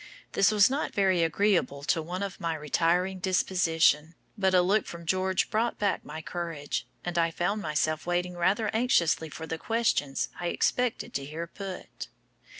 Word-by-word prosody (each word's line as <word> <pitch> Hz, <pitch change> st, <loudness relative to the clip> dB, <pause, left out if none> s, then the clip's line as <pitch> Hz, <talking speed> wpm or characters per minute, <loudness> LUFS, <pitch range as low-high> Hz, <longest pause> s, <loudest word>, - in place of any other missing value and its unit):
This 195 Hz, -, +4 dB
was 210 Hz, -1 st, +5 dB
not 275 Hz, +3 st, -2 dB
very 190 Hz, -3 st, +3 dB
agreeable 165 Hz, -4 st, +1 dB
to 165 Hz, +3 st, +1 dB
one 180 Hz, +5 st, -4 dB
of 195 Hz, -2 st, -5 dB
my 165 Hz, -1 st, -1 dB
retiring 170 Hz, +5 st, +1 dB
disposition, 165 Hz, -4 st, +2 dB, 0.2 s
but 190 Hz, -3 st, +2 dB
a 180 Hz, -, +5 dB
look 200 Hz, +4 st, +2 dB
from 170 Hz, 0 st, -8 dB
George 185 Hz, +2 st, 0 dB
brought 230 Hz, +2 st, 0 dB
back 200 Hz, -2 st, 0 dB
my 160 Hz, -, -8 dB
courage, 165 Hz, -5 st, -4 dB, 0.2 s
and 175 Hz, -1 st, -1 dB
I 165 Hz, 0 st, +3 dB
found 185 Hz, +6 st, -1 dB
myself 155 Hz, 0 st, -1 dB
waiting 175 Hz, 0 st, 0 dB
rather 200 Hz, +5 st, +1 dB
anxiously 170 Hz, -9 st, +2 dB
for 160 Hz, +2 st, -7 dB
the 165 Hz, 0 st, -4 dB
questions 225 Hz, -12 st, 0 dB
I 175 Hz, -, -2 dB
expected 245 Hz, +6 st, 0 dB
to 140 Hz, -, -3 dB
hear 155 Hz, +4 st, -5 dB
put. 190 Hz, +2 st, -8 dB
175 Hz, 165 wpm, -28 LUFS, 160-195 Hz, 0.2 s, was